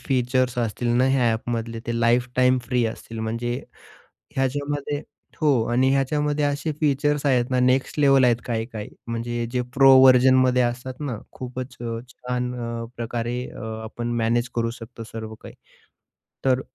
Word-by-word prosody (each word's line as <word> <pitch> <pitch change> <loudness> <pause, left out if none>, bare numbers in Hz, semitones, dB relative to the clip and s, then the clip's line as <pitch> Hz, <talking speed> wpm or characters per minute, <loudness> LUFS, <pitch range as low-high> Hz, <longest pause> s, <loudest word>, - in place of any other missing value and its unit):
Features 125 -2 0
असतील 120 +1 -1
ना 125 - +4
ह्या 125 -3 +3
ॲपमधले 115 0 -3
ते 115 0 -1
लाईफटाईम 125 +2 +3
फ्री 125 -2 +1
असतील, 115 0 -7
म्हणजे 115 +2 -2 0.8
ह्याच्यामध्ये 145 +2 -1 0.4
हो, 155 - +4 0.2
आणि 130 +2 +3
ह्याच्यामध्ये 145 +2 +1
असे 145 +2 -1
फीचर्स 145 0 +1
आहेत 125 -2 +2
ना, 130 - +1
नेक्स्ट 130 +3 +1
लेव्हल 135 -2 +5
आहेत 120 -2 +4
काही-काही. 115 -2 -4 0.2
म्हणजे 120 0 -3
जे 125 0 0
प्रो 135 0 +7
व्हर्जनमध्ये 130 -1 +6
असतात 125 +2 -2
ना, 140 -6 -3 0.2
खूपच 125 0 -7
अ, 115 -1 -3
छान 125 0 -3
अ, 115 0 -4
प्रकारे 120 +1 -3
अ, - - -10 0.2
आपण 120 +2 -5
मॅनेज 120 +2 +1
करू 115 -1 0
शकतो 115 0 -10
सर्व 110 -1 -6
काही. - - -10 0.9
तर 130 -1 +3
125 Hz, 145 wpm, -24 LUFS, 115-130 Hz, 0.9 s, प्रो